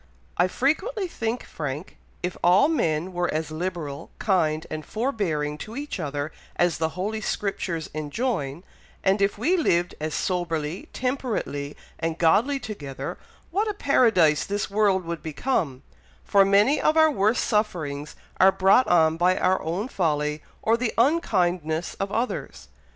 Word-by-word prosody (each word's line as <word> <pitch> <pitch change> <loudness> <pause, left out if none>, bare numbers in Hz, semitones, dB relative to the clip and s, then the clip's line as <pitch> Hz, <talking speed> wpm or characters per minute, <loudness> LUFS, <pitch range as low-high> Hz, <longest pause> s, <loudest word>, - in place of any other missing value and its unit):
"I 180 - +3
frequently 375 - 0
think, 230 -6 -3
Frank, 150 +3 -5 0.3
if 180 0 -2
all 180 +10 +6
men 180 - 0
were 175 0 0
as 155 0 -2
liberal, 160 -4 -4
kind, 160 -6 +1
and 155 0 -4
forbearing 170 - -2
to 220 +7 -8
each 285 -5 -5
other 145 -1 -3 0.2
as 175 -3 +1
the 160 0 +1
Holy 215 +4 -2
Scriptures 180 -6 -2
enjoin, 155 - -2 0.4
and 195 +1 +2
if 200 +1 +2
we 310 - +2
lived 175 - +1
as 155 0 -3
soberly, 170 -2 -2
temperately, 235 - -3 0.2
and 165 0 -2
godly 225 - +3
together, 150 - -6 0.3
what 410 +5 +1
a 415 - -3
paradise 215 - +4
this 200 0 -3
world 200 -3 +2
would 170 -1 -4
become, 155 - -2 0.4
for 200 -1 +5
many 205 +9 +4
of 310 - +3
our 315 -1 +6
worst 215 -2 +2
sufferings 155 -10 -1 0.2
are 190 +1 +7
brought 195 +7 +4
on 160 -2 +4
by 180 +2 +3
our 185 +1 +2
own 175 +8 -2
folly, 150 - -1 0.2
or 225 +1 +3
the 235 -1 -1
unkindness 180 - +1
of 195 0 -2
others. 235 +4 -3
185 Hz, 145 wpm, -25 LUFS, 155-225 Hz, 0.4 s, are